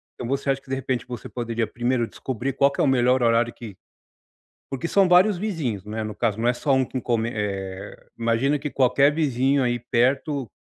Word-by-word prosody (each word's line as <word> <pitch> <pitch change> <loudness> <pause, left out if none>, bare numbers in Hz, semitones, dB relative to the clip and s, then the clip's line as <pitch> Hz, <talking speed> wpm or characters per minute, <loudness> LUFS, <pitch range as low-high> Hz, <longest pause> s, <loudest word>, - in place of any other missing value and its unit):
Então 120 - -6
você 140 +2 -2
acha 135 0 0
que, 135 - -21
de 135 - 0
repente 130 -2 -2
você 120 -6 -7
poderia 115 -1 -2
primeiro 120 +2 -1
descobrir 130 +3 -4
qual 140 +1 +4
que - - -9
é - - +3
o - - +3
melhor 125 -1 +3
horário 115 0 +2
que 105 -6 -10 0.9
porque 135 +5 -3
são 195 +2 +3
vários 180 +3 +5
vizinhos. 155 - -3
Não 105 +1 -7
é, 110 - -1
no 105 -1 -6
caso 110 -2 -1
não 120 - +1
é - - +2
só 130 +1 +1
que 130 - -4
come 115 -1 0
eh, 100 -2 -5
imagina 115 +5 +1
que 150 +1 -4
qualquer 135 +2 +3
vizinho 135 -2 +1
aí 120 -1 0
perto 130 +2 0
125 Hz, 210 wpm, -24 LUFS, 115-140 Hz, 0.9 s, vários